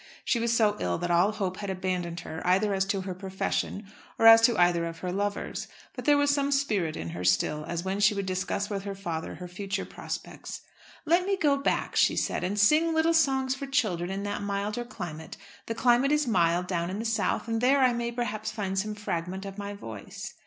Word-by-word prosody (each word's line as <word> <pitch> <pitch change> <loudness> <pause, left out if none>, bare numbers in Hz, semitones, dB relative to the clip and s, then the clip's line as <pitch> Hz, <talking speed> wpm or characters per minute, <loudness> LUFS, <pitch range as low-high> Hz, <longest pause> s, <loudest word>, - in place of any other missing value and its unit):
She 235 - +2
was 230 0 0
so 220 -3 +3
ill 90 -1 -1
that 175 - -2
all 175 +4 +4
hope 190 -4 -3
had 200 -1 -5
abandoned 180 -2 -2
her 160 - -7
either 195 +3 +2
as 190 0 +1
to 195 0 -1
her 185 0 -4
profession 190 +2 -3 0.3
or 225 - +2
as 225 0 +10
to 230 0 +4
either 175 -1 +3
of 165 0 -7
her 180 - -1
lovers. 205 +2 -3 0.3
But - - -7
there 295 -2 +5
was 285 0 +3
some 280 0 +1
spirit 210 - 0
in 85 - -5
her 85 +2 -6
still, 120 +12 +1
as 170 0 -3
when 190 +1 -1
she 205 +1 +4
would 200 -1 -2
discuss 190 +2 -2
with 200 -2 -3
her 200 -1 -5
father 170 -5 -4
her 180 - -8
future 195 +2 -4
projects. - - -7 0.4
"Let 345 +4 +3
me 395 -1 +1
go 295 -5 +3
back," 275 - -1
she - - +4
said, - - -1
"and 200 +3 -1
sing 315 +10 +4
little 320 +1 +3
songs 265 -4 +2
for 275 +1 -6
children 210 -11 0
in 195 +1 -3
that 205 0 -3
milder 205 +3 -2
climate. 165 -9 -7 0.3
The 230 - -3
climate 245 +4 +3
is 300 0 +2
mild 175 -5 +2
down 175 -2 -2
in 190 - -4
the 225 - -4
South, 225 0 0
and 225 0 -1
there 270 +2 +4
I 255 -2 +4
may, 235 0 -2
perhaps, 220 -3 -3
find 195 -3 -2
some 210 +2 -3
fragment 190 -1 -4
of 195 +1 -7
my 205 0 -5
voice." 110 - -8
200 Hz, 225 wpm, -28 LUFS, 180-235 Hz, 0.4 s, as